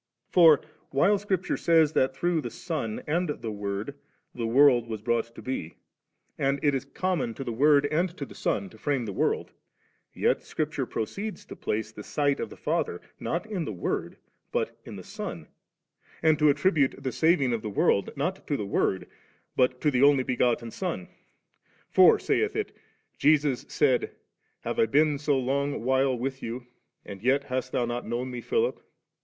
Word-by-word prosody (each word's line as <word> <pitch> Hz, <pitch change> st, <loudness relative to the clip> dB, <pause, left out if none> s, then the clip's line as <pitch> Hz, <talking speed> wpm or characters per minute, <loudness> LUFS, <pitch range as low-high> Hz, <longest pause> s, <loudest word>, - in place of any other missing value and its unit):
For, 165 Hz, -5 st, +7 dB, 0.3 s
while 195 Hz, +9 st, +3 dB
Scripture 190 Hz, -3 st, -1 dB
says 160 Hz, -2 st, +4 dB
that 130 Hz, 0 st, +2 dB
through 170 Hz, +2 st, +1 dB
the -, -, -4 dB
Son 145 Hz, -, -4 dB
and 170 Hz, +3 st, 0 dB
the 115 Hz, -6 st, -4 dB
Word 100 Hz, +4 st, -4 dB, 0.4 s
the 115 Hz, -2 st, -3 dB
world 125 Hz, -1 st, +5 dB
was 110 Hz, -2 st, -4 dB
brought 115 Hz, +2 st, -1 dB
to -, -, -10 dB
be, 125 Hz, -11 st, -4 dB, 0.6 s
and 140 Hz, +1 st, +1 dB
it 145 Hz, -2 st, +3 dB
is 135 Hz, -1 st, -2 dB
common 145 Hz, -6 st, -2 dB
to 135 Hz, -, -5 dB
the 120 Hz, -, -4 dB
Word 145 Hz, +3 st, +4 dB
and 165 Hz, +5 st, +1 dB
to -, -, -4 dB
the -, -, -13 dB
Son 200 Hz, -, -1 dB
to -, -, -16 dB
frame 140 Hz, -5 st, 0 dB
the 100 Hz, -, -4 dB
world, -, -, 0 dB, 0.6 s
yet -, -, +1 dB
Scripture -, -, -3 dB
proceeds 200 Hz, -, -4 dB
to -, -, -9 dB
place 110 Hz, 0 st, -3 dB
the 105 Hz, -, -9 dB
sight 145 Hz, +5 st, 0 dB
of -, -, -3 dB
the -, -, -12 dB
Father, -, -, -1 dB, 0.2 s
not 170 Hz, +5 st, -2 dB
in 205 Hz, -6 st, -3 dB
the 125 Hz, -, -4 dB
Word 90 Hz, -4 st, -3 dB, 0.3 s
but -, -, -1 dB
in -, -, -8 dB
the -, -, -8 dB
Son, -, -, -6 dB, 0.8 s
and 155 Hz, -2 st, +4 dB
to 150 Hz, -1 st, +5 dB
attribute 145 Hz, -2 st, +2 dB
the 130 Hz, -, -1 dB
saving 155 Hz, -6 st, +3 dB
of 115 Hz, -, -1 dB
the 110 Hz, -, -4 dB
world, 100 Hz, 0 st, +2 dB
not 180 Hz, +7 st, -2 dB
to 145 Hz, -, 0 dB
the 105 Hz, -, -3 dB
Word, 95 Hz, -1 st, 0 dB, 0.5 s
but 125 Hz, 0 st, +2 dB
to 150 Hz, -, +3 dB
the 125 Hz, -2 st, +1 dB
Only 140 Hz, -2 st, +5 dB
begotten 120 Hz, -2 st, 0 dB
Son. 170 Hz, -, -4 dB, 0.8 s
For, -, -, +7 dB
saith -, -, 0 dB
it, -, -, -3 dB, 0.4 s
Jesus 145 Hz, -3 st, +3 dB
said, 130 Hz, -5 st, +1 dB, 0.2 s
* -, -, -46 dB
Have -, -, -3 dB
I 115 Hz, -, +4 dB
been 150 Hz, +3 st, +3 dB
so 145 Hz, -1 st, +1 dB
long 140 Hz, +1 st, -1 dB
while 130 Hz, 0 st, +2 dB
with 135 Hz, +2 st, -4 dB
you, 120 Hz, +2 st, -5 dB, 0.4 s
and 100 Hz, -2 st, -9 dB
yet 135 Hz, +4 st, +2 dB
hast 130 Hz, -1 st, -3 dB
thou 120 Hz, -, +1 dB
not 120 Hz, +1 st, -4 dB
known 120 Hz, +3 st, -3 dB
Me, 125 Hz, -1 st, -5 dB
Philip 460 Hz, -, 0 dB
135 Hz, 185 wpm, -27 LUFS, 120-155 Hz, 0.8 s, For